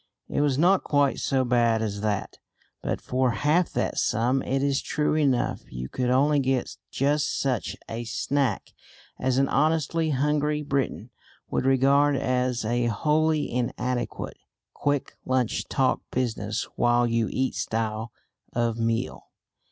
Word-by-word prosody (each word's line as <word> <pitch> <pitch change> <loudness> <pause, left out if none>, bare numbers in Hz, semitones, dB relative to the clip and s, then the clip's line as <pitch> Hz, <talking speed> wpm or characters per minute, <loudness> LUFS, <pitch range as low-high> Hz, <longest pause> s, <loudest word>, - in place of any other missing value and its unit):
It - - 0
was 145 -3 +2
not 180 +5 +4
quite 145 -2 +2
so 130 -1 +1
bad 120 -2 +2
as 100 -2 -3
that, 105 -2 -2 0.4
but - - -2
for 130 0 0
half 150 - +2
that - - -1
sum 125 +3 +1
it 135 +1 -1
is 140 -1 +1
true 150 0 0
enough 140 -5 +1
you 65 +1 -6
could 125 -1 -1
only 145 +3 +3
get 130 -2 0
just 145 +2 0
such 130 -4 -1
a 115 +1 -4
snack 135 +4 -1 0.5
as 130 0 +1
an 135 0 +3
honestly 160 +2 +1
hungry 150 +2 +1
Briton 140 -4 -2 0.4
would - - 0
regard 140 +2 +4
as 125 -2 0
a 120 +2 +1
wholly 155 +6 +1
inadequate 125 0 -2 0.4
quick 145 -1 -1
lunch 130 -3 0
talk 130 -1 +1
business 110 -3 -2
while 120 0 +3
you 115 -1 +1
eat 130 0 0
style 110 0 -2 0.4
of 115 -1 0
meal. 115 +2 -1
130 Hz, 140 wpm, -26 LUFS, 120-145 Hz, 0.5 s, not